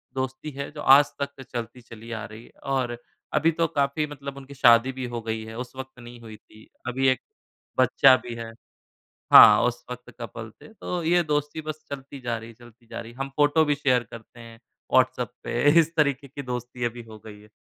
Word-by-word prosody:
दोस्ती 130 +3 -4
है 140 - -4
जो 150 -1 -8
आज 140 +2 +7 0.2
तक 140 -1 -4
चलती 120 +1 -6
चली 115 0 -12
आ 110 -1 -4
रही 110 +2 -11
है - - -18 0.2
और 120 -3 -1 0.4
अभी 165 +1 +3
तो 165 - +4
काफ़ी 140 +2 +1
मतलब 140 -1 -8
उनकी 140 +1 -11
शादी 120 -1 +5
भी 130 -1 -5
हो 115 - -3
गई 110 0 -2
है, 110 0 -9
उस 125 +1 -7
वक़्त 130 -1 -9
नहीं 120 0 -12
हुई 110 -1 -10
थी। 110 0 -19 0.2
अभी 130 +2 0
1 - - -1 0.6
बच्चा 130 +1 +6
भी 120 -1 -6
है 115 -1 -7 0.8
हाँ, 105 0 +10
उस 120 - -4
वक़्त 125 0 -9
कपल 110 0 -7
थे 220 - -15
तो 180 -5 -4
ये 175 +1 +3
दोस्ती 150 0 -2
बस 155 0 -7
चलती 140 0 -8
जा 120 -2 -2
रही 115 +1 -10
है, - - -13
चलती 120 0 -19
जा 115 0 -7
रही 115 0 -11
है। 120 - -19
हम 135 0 -3
फोटो 150 +2 +4
भी 145 -1 +1
शेयर 130 -4 +2
करते 115 +1 -12
हैं 115 0 -13 0.3
व्हाट्सऍप - - +2
पे 120 - -2 0.2
इस 165 +1 +1
तरीके 140 -2 +1
की 140 +2 -8
दोस्ती 125 -1 -4
अभी 120 0 -4
हो 110 -1 -11
गई 105 -1 -11
है। 105 - -19
125 Hz, 220 wpm, -25 LUFS, 115-140 Hz, 0.8 s, हाँ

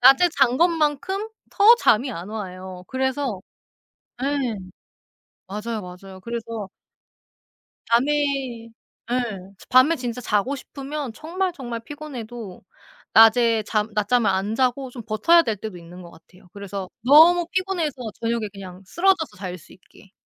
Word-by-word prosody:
낮에 270 +8 +7
잔 255 -2 +4
것만큼 335 +4 +1 0.2
더 430 +4 +7
잠이 255 - +3
안 175 +1 -7
와요. 185 -3 -7
그래서 265 -5 -2 0.8
예. 275 -5 -1 0.9
맞아요. 215 +3 -4
맞아요. 185 +1 -11
그래서 230 -3 -5 1.2
밤에 245 +6 +3 1.0
예 - - +1 0.5
밤에 260 +6 +5
진짜 250 -1 -4
자고 225 +5 0
싶으면 275 -1 -6
정말, 355 +7 -3
정말 240 -7 -6
피곤해도 240 -7 -8 0.5
낮에 225 0 +6
잠 210 +1 -1
낮잠을 215 +1 +2
안 195 +3 -1
자고 260 +2 0
좀 245 -1 -9
버텨야 235 +11 +4
될 225 -9 -2
때도 205 -1 -7
있는 175 +1 -12
것 170 - -12
같아요. 180 +3 -20
그래서 200 -2 -6 0.2
너무 330 +6 +7
피곤해서 370 -5 -1 0.3
저녁에 230 -2 -1
그냥 190 -2 -10
쓰러져서 345 - +1
잘 185 -1 -6
수 - - -18
있게. 185 +1 -20
235 Hz, 265 characters per minute, -23 LUFS, 200-290 Hz, 1.2 s, 낮에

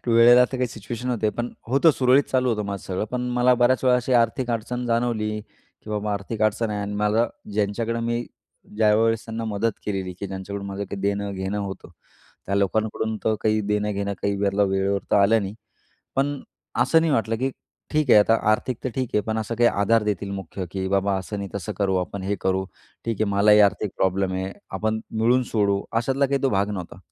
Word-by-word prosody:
त्या 120 - +2
वेळेला 120 +2 +7
तर 130 - -1
काही 125 - 0
सिच्युएशन 115 +3 -6
होते, 110 -3 0
पण 120 +2 -4 0.2
होतं 140 +6 +5
सुरळीत 130 -1 +4
चालू 130 -1 +2
होतं 105 -2 -1
माझं 100 -2 -4
सगळं. 95 +2 -2
पण 125 - -2 0.2
मला 125 +1 +5
बऱ्याच 125 +2 +2
वेळा 125 -1 +5
अशी 125 +1 -2
आर्थिक 120 +2 -2
अडचण 120 +2 -3
जाणवली, 115 -2 0
की 105 0 -17
बाबा 105 0 -1
आर्थिक 105 +2 -4
अडचण 110 +1 +1
आहे. 105 -1 -2
आणि 100 0 -4
मला 105 +3 +2 0.3
ज्यांच्याकडं 110 +3 -1
मी 120 +1 -1 0.5
ज्यावेळेस 110 +1 +3
त्यांना 115 0 -5
मदत 110 +1 0
केलेली 95 -3 -2
की 100 - -3
ज्यांच्याकडून 100 +1 -6
माझं 100 +1 -4
काही 100 +1 -7
देणं-घेणं 100 0 -2
होतं, 100 -4 -6 0.6
त्या 100 - -1
लोकांकडून 110 +2 0
तर 110 - +2
काही 110 0 +2
देणं-घेणं 105 -1 -1
काही 100 0 0
वेळला 100 0 +1
वेळेवर 100 +1 +1
तर - - +4
आलं 105 +2 +4
नाही. 100 +1 -5 0.6
पण 140 +1 0 0.4
असं 160 +6 +4
नाही 160 -2 +1
वाटलं 115 -3 +1
की 130 +3 -1 0.4
ठीक 155 -4 +1
आहे, - - +9
आता 115 +2 +4 0.2
आर्थिक 115 +2 0
तर - - +1
ठीक 130 -3 -1
आहे, 105 - +4
पण 110 0 -2
असं 110 +1 -3
काही 120 +1 +4
आधार 105 +3 +2
देतील 100 -1 -2
मुख्य 95 0 -5
की 95 -1 -3
"बाबा 100 0 +1
असं 100 +2 -6
नाही 100 -1 -4
तसं 95 -5 -4
करू, 95 -2 +1
आपण 95 +1 -3
हे 100 +1 -1
करू. 95 0 0 0.4
ठीक 115 -2 -1
आहे, - - +4
मलाही 105 +1 +5
आर्थिक 100 0 -2
प्रॉब्लेम 95 0 +1
आहे. 95 +1 -3 0.2
आपण 110 +3 -1 0.2
मिळून 125 +3 +4
सोडवूं," 100 -2 +2 0.2
अशातला 135 +4 +1
काही 140 0 -1
तो 135 - +3
भाग 100 +1 +1
नव्हता. 90 -3 -6
105 Hz, 205 wpm, -24 LUFS, 100-120 Hz, 0.6 s, आहे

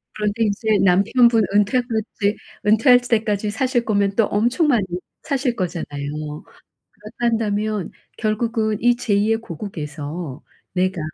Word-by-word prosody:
그런데 210 +1 -1
이제 215 +1 +1
남편분 220 +5 +4
은퇴할 210 +5 +3 0.4
때 205 0 +2 0.3
은퇴할 225 +4 +6
때까지 215 -3 0
사실 250 0 0
거면 200 -2 +1
또 225 - +4
엄청 240 - +1
많이 240 -9 +2 0.4
사실 265 -4 -1
거잖아요. 150 -5 -4 0.3
그렇다 210 +1 -16
한다면 215 -4 0 0.3
결국은 220 0 0
이 240 0 +3
제 235 -4 -1
2 205 +2 +2
의 - - +3
고국에서 155 - -6 0.3
내가 185 -1 0
210 Hz, 275 characters per minute, -21 LUFS, 190-230 Hz, 0.4 s, 은퇴할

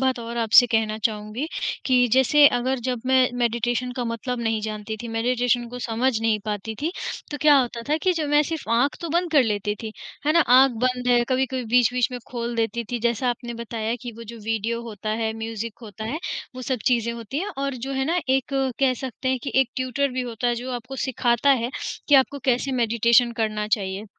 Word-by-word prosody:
बात 260 -1 +1
और 235 0 -6
आपसे 235 +1 +6
कहना 220 -2 0
चाहूँगी 215 +4 -2 0.4
कि 250 -2 +4
जैसे 265 +3 +6
अगर 260 +2 -1
जब 250 -2 -1
मैं 260 -1 +4
मेडिटेशन 240 +1 0
का 245 - -1
मतलब 235 +1 -3
नहीं 225 -1 0
जानती 215 0 -4
थी, 235 - -6
मेडिटेशन 240 +1 0
को 245 +1 -7
समझ 235 0 0
नहीं 225 -1 +2
पाती 210 +1 -4
थी 320 - 0 0.4
तो 290 - -3
क्या 300 -1 +7
होता 240 -2 -1
था 305 - +2
कि 370 - +3
जब 315 -4 -2
मैं 295 0 +4
सिर्फ़ 320 0 -5
आँख 250 +4 +2
तो 335 - -4
बंद 345 +2 0
कर 290 -4 +6
लेती 210 -2 -1
थी, 220 -1 -5 0.3
है 305 - +4
ना? 335 - +5
आँख 260 -2 +6
बंद 250 -1 0
है 240 -1 +5
कभी-कभी 260 -1 0
बीच-बीच 245 +1 +2
में 250 - -4
खोल 235 -1 -3
देती 230 +1 -1
थी। 245 - -1
जैसा 235 +2 0
आपने 240 0 -5
बताया 230 0 -3
कि 240 -1 -6
वो 230 - -9
जो 235 0 -8
वीडियो 225 +1 -1
होता 215 -2 -6
है 220 0 0
म्यूज़िक 225 0 -5
होता 220 -1 -8
है 250 +8 -3 0.4
वो 255 - -7
सब 260 0 -1
चीज़ें 235 -2 +2
होती 235 +3 -5
हैं 385 +5 -2
और 275 0 -1
जो 275 - -3
है 265 0 0
ना 335 +5 +1
एक 265 0 +2 0.4
कह 265 -2 +3
सकते 260 +1 -5
हैं 260 0 +1
कि - - -4
एक 265 - +1
ट्यूटर 260 +2 0
भी 255 0 -2
होता 240 -1 -3
है, 240 - +1
जो 245 +2 -5
आपको 250 +2 -6
सिखाता 245 +1 +2
है 240 - -2 0.4
कि 290 - +6
आपको 275 +1 +4
कैसे 260 +1 +1
मेडिटेशन 235 0 +3
करना 215 -2 -1
चाहिए? 200 -2 -1
240 Hz, 220 wpm, -24 LUFS, 225-260 Hz, 0.4 s, क्या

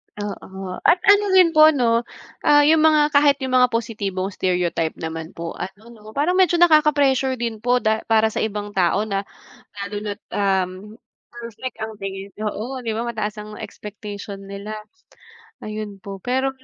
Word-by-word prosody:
Oo. 190 -2 -6
At 355 +1 +4
ano 405 +1 +6
rin 360 -3 +6
po 310 0 +8
'no, 235 -5 +2 0.4
ah, 290 0 +6
'yung 315 0 +5
mga 305 -1 +4
kahit 285 -1 +5
'yung 260 -1 -3
mga 250 -1 +5
positibong 205 -5 -3
stereotype 175 -3 -1
naman 160 0 -6
po 165 0 -5
ano 210 +5 -8
'no, 215 -2 -14
parang 300 +6 +1
medyo 350 -2 +4
nakaka-pressure 290 -6 +4
din 230 -2 -3
po 245 +1 +2
da 220 0 +1
para 220 -1 +3
sa - - -2
ibang 205 -1 -3
tao 190 +2 +2
na 195 -2 -1 0.6
lalo 200 +1 -5
na't, 205 -1 -5
um, 190 -2 +1 0.6
perfect 240 +1 -8
ang 220 0 -4
tingin. 195 0 -5 0.2
Oo, 245 +5 -4
di 230 - -3
ba, 230 +2 -3
mataas 215 -2 -3
ang 210 0 -8
expectation 205 -1 -8
nila. 200 +2 -7 0.9
Ayun 210 -2 -6
po, 195 -1 -7
pero 260 +5 0
220 Hz, 160 wpm, -21 LUFS, 200-260 Hz, 0.9 s, po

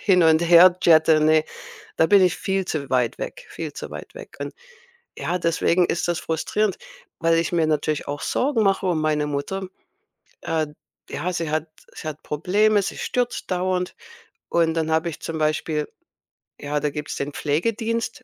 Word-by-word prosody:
hin 185 -4 +4
und 160 0 +5
her 175 +1 +7
jette. 160 -1 +5
Ne, 155 0 +4 0.5
da 160 - +5
bin 200 +1 +6
ich 180 -2 +3
viel 190 -1 -1
zu 145 -5 -3
weit 125 -2 +1
weg, - - -6
viel - - -6
zu - - -7
weit - - -9
weg. - - -11
Und, - - -5 0.6
ja, 180 - -2
deswegen 170 +1 +2
ist 175 - -1
das 175 -1 0
frustrierend, 190 +6 -1 0.4
weil 165 0 +3
ich 165 - -1
mir 165 -2 +2
natürlich 155 0 -1
auch 145 0 -4
Sorgen 255 -4 +1
mache 195 -1 +1
um 170 -4 +1
meine 150 -1 +1
Mutter. 180 +7 -3 0.7
Äh, 160 -1 -1 0.4
ja, 180 - -3
sie 165 -3 -2
hat 155 +1 -1 0.3
sie - - -7
hat 155 -1 -6
Probleme. 205 +7 +2
Sie - - -4
stürzt 245 -1 -2
dauernd. 180 0 -1 0.5
Und 165 -1 +2
dann 160 -1 -1
habe 160 +2 +1
ich 155 - -8
zum 160 -1 -4
Beispiel 155 0 0 0.7
ja, 145 +1 -1
da 150 - 0
gibt's 150 +1 -5
den 140 +1 -3
Pflegedienst 225 - -1
165 Hz, 175 wpm, -23 LUFS, 155-185 Hz, 0.7 s, her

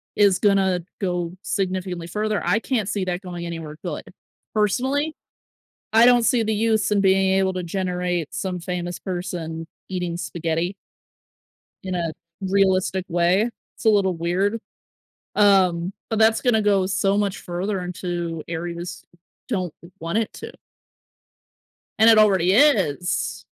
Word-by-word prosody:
is 200 -4 +4
gonna 190 -3 +3 0.2
go 175 -3 -1
significantly 185 -3 -2
further. 210 +3 -1
I 215 - +3
can't 225 -5 -1
see 200 -3 -1
that 180 0 -2
going 175 -2 -6
anywhere 165 -3 -6
good. - - -4 0.5
Personally, 265 +9 +1 0.8
I 225 +2 +7
don't 245 -1 +6
see 240 0 +3
the 220 0 0
use 220 0 +1
in 205 -1 +3
being 190 0 +3
able 190 -1 +2
to 185 - -3
generate 180 -2 -2
some 185 -2 -3
famous 175 0 -4
person 170 -3 -5 0.2
eating 180 -2 -3
spaghetti 170 +1 -2 1.1
in 185 -1 -3
a 170 -2 -1 0.3
realistic 190 -1 +1
way. 180 +6 +2 0.3
It's - - -11
a 220 - +6
little 195 -4 +2
weird, 185 +6 0 0.8
um, 190 -3 +4 0.2
but 220 - -1
that's 220 0 +4
gonna 235 -4 +3
go 200 -2 +3
so 195 +1 +1
much 200 -2 0
further 185 +3 -3
into 175 -2 -4
areas 170 +1 -5 0.4
don't 185 -9 -2 0.3
want 165 +5 -2
it 225 - -2
to. - - -8 1.5
And 220 +1 +6
it 225 -1 +7
already 190 -4 +4
is. 195 - +2
190 Hz, 135 wpm, -23 LUFS, 175-210 Hz, 1.5 s, I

